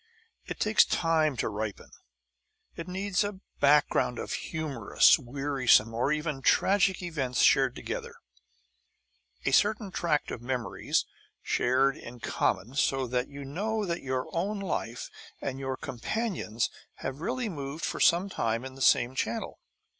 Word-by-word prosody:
It - - -6
takes 215 0 +5
time 160 -4 +1
to - - 0
ripen. 105 0 -5 0.8
It 165 - -7
needs 190 +2 0
a 205 -2 -4 0.2
background 140 -3 +3
of - - -4
humorous, 150 -9 +2
wearisome, 130 -4 +2
or 120 +5 0
even 150 -2 -2
tragic 190 +4 +3
events 135 -8 -1
shared 135 -2 +4
together, 475 -1 -5 1.3
a - - +2
certain 210 -1 +2
tract 160 -5 0
of 115 - -5
memories 125 -2 -1 0.4
shared 135 +3 +2
in 120 +1 -10
common, 110 0 -1
so 135 -1 +1
that 125 0 -1
you 140 0 -8
know 210 +9 -2
that 170 -1 -2
your 130 -1 -2
own 200 +5 -1
life 125 -11 -3 0.3
and 135 -1 -4
your 135 -1 -3
companion's 130 - -2 0.3
have 135 +3 -4
really 245 +5 -2
moved 145 -3 -5
for - - -3
some 175 +3 +4
time 115 - -2
in 130 - -7
the 135 - -11
same 120 0 +4
channel. 115 -3 -3
140 Hz, 140 wpm, -29 LUFS, 125-180 Hz, 1.3 s, takes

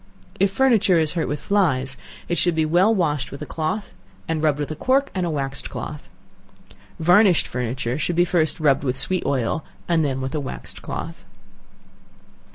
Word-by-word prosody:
If 195 +1 +4
furniture 215 -5 +3
is 155 -2 +1
hurt 170 -2 -1
with 145 - -3
flies, 135 -10 +1 0.3
it 175 - 0
should 175 -2 +2
be 160 -1 +2
well 175 +7 +4
washed 150 - 0
with 140 - -8
a - - -5
cloth, 160 +8 -3 0.3
and 160 -1 -1
rubbed 150 -2 +2
with 145 0 -3
a - - -3
cork 270 - +1
and 185 -2 -1
a - - -1
waxed 135 -3 -3
cloth. 150 - -7 0.9
Varnished 180 +2 +5
furniture 125 +1 -3
should 175 - -1
be 175 +1 +4
first 165 -2 +2
rubbed 145 -3 +3
with 130 -1 -1
sweet 185 +7 -1
oil, 140 +3 0 0.2
and 165 -2 +2
then 135 -3 -1
with 130 0 -4
a 155 - -1
waxed 140 - -7
cloth. - - -6
155 Hz, 180 wpm, -22 LUFS, 140-180 Hz, 0.9 s, Varnished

